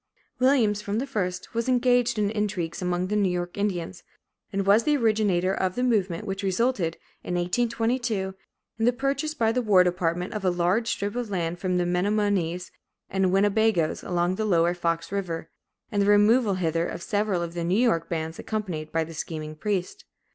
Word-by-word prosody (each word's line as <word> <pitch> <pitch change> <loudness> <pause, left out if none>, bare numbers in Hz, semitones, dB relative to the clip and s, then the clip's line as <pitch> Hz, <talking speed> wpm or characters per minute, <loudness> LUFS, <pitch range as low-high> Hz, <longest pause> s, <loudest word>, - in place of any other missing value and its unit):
Williams, 245 -6 +3
from 205 0 -2
the 255 - -1
first, 185 -9 -3
became 230 +3 +1
engaged 245 -1 +2
in 205 -1 +1
intrigues 200 -7 -2
among 180 0 0
the 205 +3 -2
New 200 -3 +2
York 175 0 -3
Indians, 185 - -2 0.5
and 195 0 -1
was 200 +3 +5
the 295 +2 +2
originator 210 -6 +2
of 185 -1 -1
the 250 - -1
movement 210 -6 0
which 195 -1 -3
resulted, 195 -3 0 0.3
in 180 - -3
1822, 225 +1 0 0.5
in 225 - +2
the 245 - +4
purchase 275 +4 -1
by 225 -6 +2
the 250 +2 0
war 200 -5 +5
department 180 0 -1
of 215 -2 -4
a 185 - +3
large 180 +6 +1
strip 205 +1 -2
of 245 -3 -3
land 175 -3 -2
from 185 -1 0
the 175 - +1
Menomonees 180 -1 0 0.4
and 190 -1 +2
Winnebagoes, 200 -3 +2
along 175 +1 0
the 215 - -1
Lower 175 -3 +3
Fox 165 -1 -2
River, 170 -5 -3 0.4
and 205 -2 +1
the 200 - +2
removal 205 +1 +4
hither 165 -1 0
of 170 - -6
several 205 -5 0
of 170 0 -5
the 170 -1 -3
New 180 +4 +1
York 225 -10 +2
bands, 160 -1 -3
accompanied 180 -8 -4
by 165 0 +1
the 165 +1 -9
scheming 155 -1 -5
priest. 200 - -3
195 Hz, 185 wpm, -26 LUFS, 175-220 Hz, 0.5 s, was